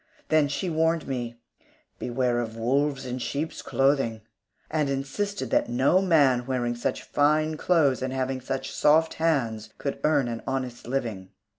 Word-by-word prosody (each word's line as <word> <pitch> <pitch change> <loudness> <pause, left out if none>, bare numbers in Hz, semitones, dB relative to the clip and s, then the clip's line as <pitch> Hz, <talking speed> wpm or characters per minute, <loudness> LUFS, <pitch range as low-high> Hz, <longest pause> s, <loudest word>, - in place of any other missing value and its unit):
Then 155 -2 +4
she 145 +7 -3
warned 160 0 +1
me, 120 -3 -4 0.6
"Beware 125 -1 0
of 115 -1 -4
wolves 135 +3 0
in 125 0 -4
sheep's 150 +5 -3
clothing," 135 -5 +1 0.5
and 155 -3 +1
insisted 140 +10 -3
that - - +2
no 135 +10 +3
man 140 -9 +3
wearing 125 -2 0
such 120 - -3
fine 155 +2 +2
clothes 155 -6 +2
and 130 0 -2
having 130 0 -2
such 135 +1 -4
soft 160 +2 +4
hands 115 -10 0
could 140 - -4
earn 150 -4 +3
an 115 -1 -4
honest 130 -3 -3
living. 115 -8 -3
135 Hz, 150 wpm, -26 LUFS, 120-150 Hz, 0.6 s, Then